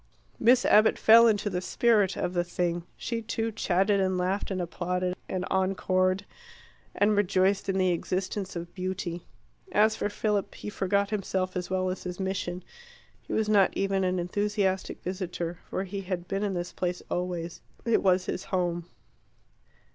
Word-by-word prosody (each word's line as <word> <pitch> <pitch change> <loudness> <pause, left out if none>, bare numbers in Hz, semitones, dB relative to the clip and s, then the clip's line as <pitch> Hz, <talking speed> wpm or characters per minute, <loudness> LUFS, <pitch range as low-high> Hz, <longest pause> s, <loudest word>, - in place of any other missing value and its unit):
Miss 245 +2 +5
Abbott 215 +1 +5
fell 230 +1 +7
into 210 -2 +1
the 180 -3 -1
spirit 205 -1 +2
of 180 - -2
the 175 -1 +1
thing. 175 -1 -2
She, 230 -1 -3
too, 225 0 -2
chatted 200 -1 +2
and 185 -1 +1
laughed 185 +3 -1
and 190 -2 -2
applauded 180 +1 -2
and 185 -1 -2
encored, 185 0 +1 0.7
and 210 +1 +3
rejoiced 195 0 +2
in 190 - +1
the 185 -1 +3
existence 185 +3 -2
of 170 0 -6
beauty. 185 -2 -4 0.4
As 215 - +4
for 205 - -1
Philip, 205 -1 -1
he 210 - -6
forgot 200 +1 0
himself 190 -3 -1
as 180 -1 -3
well 185 0 0
as 185 - -5
his 180 0 -6
mission. 185 -2 -3 0.6
He - - -11
was 220 -1 +1
not 205 -3 +3
even 195 -1 +1
an 185 0 +1
enthusiastic 195 +1 -1
visitor. 175 -2 -4
For 190 - -2
he 195 +1 -5
had 180 -2 -4
been 195 0 -2
in 200 -2 -1
this 175 0 -4
place 180 -1 -2
always. 175 -2 -3 0.2
It 230 -1 +3
was 185 -1 +3
his 180 - -4
home. 175 -2 -1
185 Hz, 165 wpm, -28 LUFS, 180-205 Hz, 0.7 s, fell